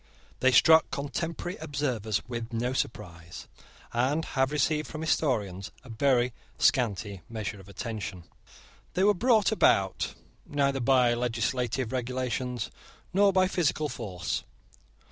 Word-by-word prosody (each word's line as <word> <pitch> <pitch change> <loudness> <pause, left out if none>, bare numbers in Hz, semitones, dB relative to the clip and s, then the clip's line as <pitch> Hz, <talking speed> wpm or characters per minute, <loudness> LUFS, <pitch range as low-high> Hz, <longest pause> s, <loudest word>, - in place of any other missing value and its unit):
They 130 - +5
struck 160 +5 +6
contemporary 165 +4 -4
observers 130 -9 -2
with 120 -1 -5
no 120 +2 -1
surprise, 90 -9 -5 0.5
and 135 +7 +1
have 130 0 0
received 150 +1 +1
from 155 - -6
historians 105 - 0
a 130 - -14
very 125 +1 +2 0.2
scanty 105 -5 +1
measure 110 -2 -4
of 95 +1 -14
attention. 100 -4 -5 0.7
They 185 - +2
were 205 +1 +6
brought 225 0 +3
about 95 - +2 0.3
neither 140 -1 0
by 125 -1 +4
legislative 120 +1 -1
regulations 125 -1 -2 0.4
nor 200 +1 +5
by 185 -1 +3
physical 155 -4 0
force. 95 -10 -4
125 Hz, 120 wpm, -28 LUFS, 110-150 Hz, 0.7 s, struck